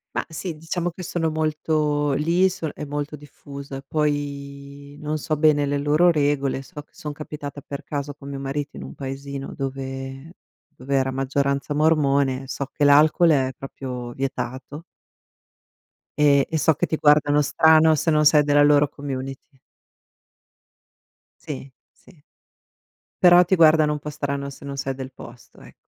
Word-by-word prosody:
Ma - - 0
sì, 165 +1 -5
diciamo 170 +2 -3
che 180 - -10
sono 165 -2 -2
molto 155 -1 0
lì 165 +7 +2
son 170 -4 -4
è - - -7
molto 145 +1 -4
diffusa, 140 -1 -10
e - - -8
poi 140 -1 -4
non 155 +1 -2
so 155 +1 -2
bene 150 -2 +3
le 140 0 -1
loro 150 +5 +4
regole, 145 -3 0
so 145 +2 -10
che - - -42
son 150 -1 -7
capitata 145 -1 -8
per 140 +2 -7
caso 145 -1 -4
con 140 -1 -11
mio 140 - -5
marito 140 +2 -4
in - - -7
un - - -9
paesino 135 0 -6
dove 135 +3 -6 0.4
dove 135 +2 -3
era 135 0 +1
maggioranza 140 +2 -1
mormone, 140 -4 +2
so 140 0 -4
che - - -2
l'alcol 150 +4 +5
è 135 -4 +2
proprio 125 -3 -7
vietato. 130 +3 -5 1.3
E 140 -2 +4
e 160 - -2
so 160 - +4
che - - 0
ti 160 - -2
guardano 150 -1 +4
strano 160 +2 +5
se 160 - 0
non 150 0 +3
sei 150 0 +6
della 145 0 +3
loro 145 0 +5
community. 135 -1 -6 2.0
Sì, 140 -3 -6 0.2
sì. 190 - -22 1.1
Però 175 0 +8
ti 190 - +2
guardano 155 -2 +5
un 150 - -4
po' 150 - -6
strano 140 -1 -3
se 140 - -12
non 140 - -5
sei 135 0 -3
del 130 -1 -8
posto, 120 -1 -14
ec - - -15
145 Hz, 160 wpm, -23 LUFS, 140-155 Hz, 2.0 s, Però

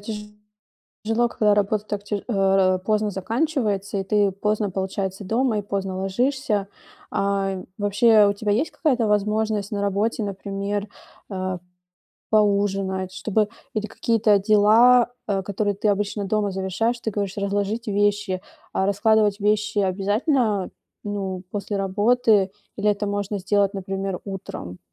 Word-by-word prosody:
тяжело, 210 0 -10 0.7
когда 210 -3 +2
работа 205 +1 +1
так 205 -1 -4
т 205 -1 -3
э, 195 -4 +3
поздно 215 0 +1
заканчивается, 210 - -1
и - - -2
ты, 200 0 +2
поздно, 210 +1 -1
получается, 190 +1 -3
дома 225 +2 +1
и - - -2
поздно 195 -2 -3
ложишься. 210 +1 0 0.4
Ай, 195 -1 -1
вообще, 210 +1 +5
у 200 - +2
тебя 205 +1 -2
есть 250 +10 +1
какая-то 255 -8 +1
возможность 210 0 0
на 205 - -2
работе, 205 +3 0
например, 200 +1 -3 0.4
э, 185 -1 -3 0.7
поужинать, 195 -3 +1
чтобы 215 +1 0 0.3
или 215 0 -1
какие-то 215 -1 +2
дела, 225 +4 +5 0.2
а, 195 -2 0
которые 205 +1 -1
ты 210 +2 -1
обычно 205 0 0
дома 210 0 0
завершаешь? 195 +5 -1
Ты 220 - -2
говоришь, 200 -2 -3
разложить 205 +3 -1
вещи. 205 -2 0 0.3
А 190 - +1
раскладывать 205 0 +3
вещи 210 0 +1
обязательно, 205 - +1 0.3
ну, 195 -3 -3
после 205 0 -3
работы, 205 +1 +3 0.3
или 210 +1 +1
это 205 0 -1
можно 205 0 -2
сделать, 200 +1 +1
например, 195 -1 -3
утром? 185 - -7
205 Hz, 130 wpm, -23 LUFS, 195-215 Hz, 0.7 s, вообще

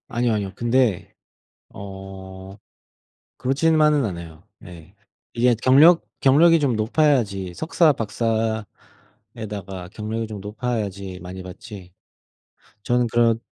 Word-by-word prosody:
아니요, 120 0 0
아니요. 100 -3 -3
근데 120 -4 0 0.6
어 95 0 -10 0.8
그렇지만은 150 +2 +2
않아요. 85 -4 -7 0.2
예. 90 +1 -13 0.4
이게 120 0 +3
경력 155 +7 +6 0.2
경력이 165 +5 +5
좀 140 -5 +1
높아야지 110 - +1
석사 160 - +2
박사에다가 110 -3 -5
경력이 110 +1 -4
좀 105 -2 -8
높아야지 100 -4 -4
많이 95 +1 -8
받지. 95 -1 -11 0.9
저는 120 +1 +1
그런 115 0 +2
110 Hz, 235 characters per minute, -22 LUFS, 95-125 Hz, 0.9 s, 경력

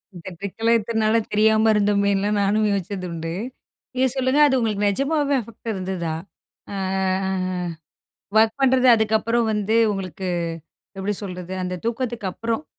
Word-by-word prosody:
இந்த 170 - -10
ட்ரிக்கு 200 +4 -7
எல்லாம் 230 +1 +4
இத்தன 225 +1 -2
நாள் 215 +1 +3
தெரியாம 220 +1 +4
இருந்தோமேன்ல்லாம் 200 0 +2
நானும் 210 +2 +2
யோசிச்சது 195 -1 -3
உண்டு. 165 0 -4 0.6
நீங்க 260 +1 +2
சொல்லுங்க 260 +2 +1
அது 265 -2 +2
உங்களுக்கு 210 -3 0
நிஜமாவே 280 +6 +1
அஃபெக்ட் 230 +1 -7
இருந்ததா? 185 -4 -3 0.6
ஆ, - - -4 1.6
ஒர்க் 220 +4 +3
பண்றது 260 -1 +4
அதுக்கப்புறம் 220 +1 +1
வந்து 210 +1 0 0.2
உங்களுக்கு 190 -2 -5 0.7
எப்பிடி 200 +2 -1
சொல்றது, 180 -2 -6
அந்த 180 0 -3
தூக்கத்துக்கு 235 -2 -2
அப்பறம், 230 +8 -3
215 Hz, 130 wpm, -22 LUFS, 195-230 Hz, 1.6 s, எல்லாம்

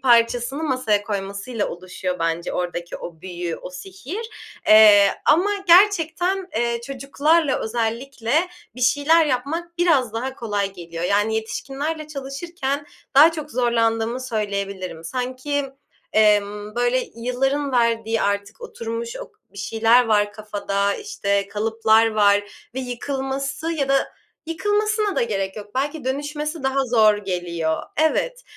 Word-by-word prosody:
parçasını 245 +3 +3
masaya 255 -8 +1
koymasıyla 200 +3 -3
oluşuyor 180 0 -5
bence 165 +1 -1
oradaki 175 -1 -3
o 165 -2 -9
büyü, 175 -2 -5
o - - -9
sihir. 220 - -7 0.4
Eee, 210 -2 +8 0.2
ama 350 +7 +4 0.2
gerçekten, 360 0 +4
eee, 235 0 0
çocuklarla 280 +3 +1
özellikle 230 +2 -3 0.4
bir 250 - -10
şeyler 290 +6 +4
yapmak 325 +7 -3
biraz 285 -10 +3
daha 260 +4 -3
kolay 205 -5 -2
geliyor. 170 -2 -6
Yani, 205 +4 +2
yetişkinlerle 275 +8 -3
çalışırken 280 0 -4 0.3
daha 305 +5 +8
çok 305 -2 -6
zorlandığımı 230 -1 +1
söyleyebilirim. 200 -7 -4
Sanki, 255 - -2 0.5
emm, 210 0 +2
böyle, 245 +1 +1
yılların 270 +4 -1
verdiği 230 -2 +1
artık 200 +2 -2
oturmuş, 230 +1 -5
ok - - -9 0.2
bir 200 - -12
şeyler 225 +4 +3
var 205 -2 +2
kafada, 200 -2 -2
işte, 200 - -1
kalıplar 220 +1 +3
var 205 -1 +3 0.2
ve 265 - -2
yıkılması 270 +4 -3
ya 280 -4 -1
da 275 0 +2 0.4
yıkılmasına 415 +4 0
da - - +3
gerek 195 -3 -2
yok. 205 +2 -9
Belki 285 +2 -2
dönüşmesi 295 +3 -3
daha 270 0 +1
zor 220 -3 +4
geliyor. 175 -5 -2
Evet, - - +1
235 Hz, 125 wpm, -22 LUFS, 205-285 Hz, 0.5 s, Eee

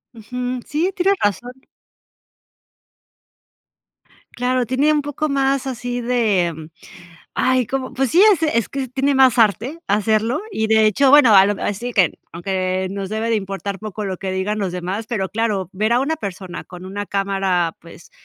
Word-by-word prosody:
Ujú. 250 +3 -5
Sí, 325 +5 -1
tienes 385 +2 +2
razón. 205 +4 -1 2.8
Claro, 250 0 0
tiene 265 +6 +2
un 300 -1 +2
poco 290 +2 -3
más 275 -1 +1
así 245 -1 -4
de, 190 -10 0 0.7
ay, 255 -1 +2
¿cómo? 265 +1 -3
Pues 265 -1 -1
sí, 355 - +5
es 335 -5 -1
es 235 -9 +1
que 270 -1 -4
tiene 270 +3 0
más 260 -2 +4
arte 230 - +2
hacerlo 215 +3 +1
y 220 - -1
de 220 0 +4
hecho, 260 +6 +3
bueno, 270 -6 +7
a 190 - +8
lo 205 +1 +1
me - - -8
así 235 +5 -3
que 190 -6 +2
aunque 185 +1 -2
nos 195 -1 -5
debe 220 +1 -2
de 230 - +2
importar 195 0 -4
poco 215 0 -6
lo 190 -1 -3
que 190 +1 -4
digan 190 +3 -2
los 195 -4 -2
demás, 185 +5 -4
pero 205 -5 -2
claro, 210 -4 -1
ver 215 +4 0
a 240 - +3
una 310 +4 -1
persona 185 - -7
con 180 0 -11
una 205 +2 -5
cámara, 195 -4 -1
pues 170 0 -15
220 Hz, 170 wpm, -20 LUFS, 195-255 Hz, 2.8 s, a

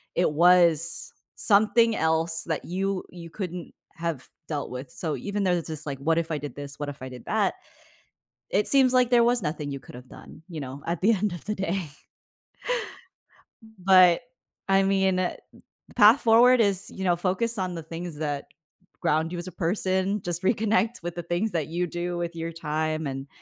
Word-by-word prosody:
it 175 -3 +2
was 170 0 +4 0.2
something 225 +2 +4
else 160 -1 +1
that - - -3
you 190 +1 -2
you 170 -2 -10
couldn't 180 -2 -6 0.2
have 165 -6 -4 0.2
dealt 145 -3 -3
with. 125 +1 -7
So 160 -4 -4
even 205 0 -3
though 180 -1 +2
this 170 -1 -3
is 155 -1 -4
like, 135 -2 -5
"What 165 +3 +1
if 165 -1 -1
I 155 - 0
did 145 0 -7
this? 145 0 -8
What 145 - -3
if 140 -2 -8
I 130 - -6
did 125 -2 -11
that?" - - +1 1.0
It 210 - +2
seems 265 -2 +5
like 250 -1 +4
there 240 -1 +5
was 240 -1 +2
nothing 150 -3 -3
you 140 - -5
could've 125 0 -12
done, 160 - -14
you 165 -4 -7
know, 135 +1 -8
at 170 0 -2
the 215 +4 +4
end 200 -1 -1
of 175 - -8
the 210 0 -2
day. 190 -4 -2 1.9
But, 185 0 +6 0.5
I 195 0 +4
mean, 190 -1 +2
uh, 180 -1 0 0.6
path 225 +4 +7
forward 240 +2 +6
is, 200 -3 0
you 190 - -7
know, 175 -2 +3
focus 200 +6 -1
on 185 -2 -2
the 165 - -6
things 165 -1 -7
that 145 -2 -3 0.6
ground 165 0 +1
you 175 - -4
as 175 +1 -6
a - - -6
person, 190 +3 0
just 175 +1 -3
reconnect 220 0 +1
with 175 0 -4
the 175 - -5
things 175 +6 -1
that 160 -4 -1
you 175 +2 -2
do 175 +1 -3
with 170 0 -4
your 165 0 -4
time 155 -1 -2
and, 135 +1 -5
175 Hz, 190 wpm, -26 LUFS, 160-195 Hz, 1.9 s, path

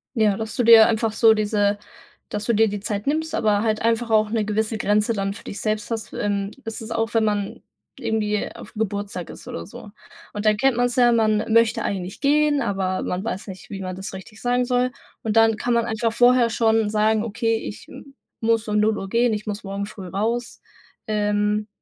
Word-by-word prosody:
Ja, 215 -4 +2
dass 220 -1 -5
du 245 - +1
dir 225 -1 +8
einfach 220 0 0
so 225 0 +5
diese 205 -1 +1 0.5
dass 210 0 -4
du 235 - +1
dir 225 +1 +4
die 205 0 -3
Zeit 205 0 -4
nimmst, 315 +3 -1
aber 210 -2 +2
halt 215 -1 0
einfach 230 +1 +1
auch 215 -1 +3
'ne 220 -1 0
gewisse 215 +1 -1
Grenze 210 +1 +1
dann 195 -2 -2
für - - -12
dich 200 - -7
selbst 215 +1 -2
hast. 225 -1 -4
Ähm, 200 -1 -2
das 225 0 -6
ist 225 0 -8
auch, 225 0 -1
wenn 225 -1 +3
man 205 -2 -2 0.4
irgendwie 210 -2 -1
auf'm 210 - -12
Geburtstag 205 -4 -3
ist - - -11
oder 85 - -6
so. 210 - -11 0.4
Und 205 0 -5
da 215 - +5
kennt 260 +2 +2
man's 245 0 +1
ja, 245 -1 +5
man 220 -1 +1
möchte 230 0 +3
eigentlich 190 0 -4
gehen, 295 0 +3
aber 190 -1 -1
man 180 +2 -3
weiß 220 -2 -4
nicht, 190 -1 -10
wie 195 -1 -6
man 185 -1 -5
das 195 +2 -7
richtig 190 +3 -11
sagen 245 0 +1
soll. 250 0 +1 0.3
Und 220 -1 -2
dann 225 -1 +5
kann 240 +2 -1
man 235 -1 +2
einfach 225 0 -1
vorher 245 0 +4
schon 225 -1 +2
sagen: 215 0 +2
„Okay, 225 +1 0
ich 210 - -8 0.5
muss 225 0 +1
um 210 0 +1
0:00 210 -2 0
gehen, 235 +2 +2
ich 210 0 -4
muss 210 -1 -5
morgen 200 0 -4
früh 200 -2 -9
raus.“ 225 +6 -3 0.5
Ähm, 210 0 0
215 Hz, 210 wpm, -22 LUFS, 205-230 Hz, 0.5 s, dir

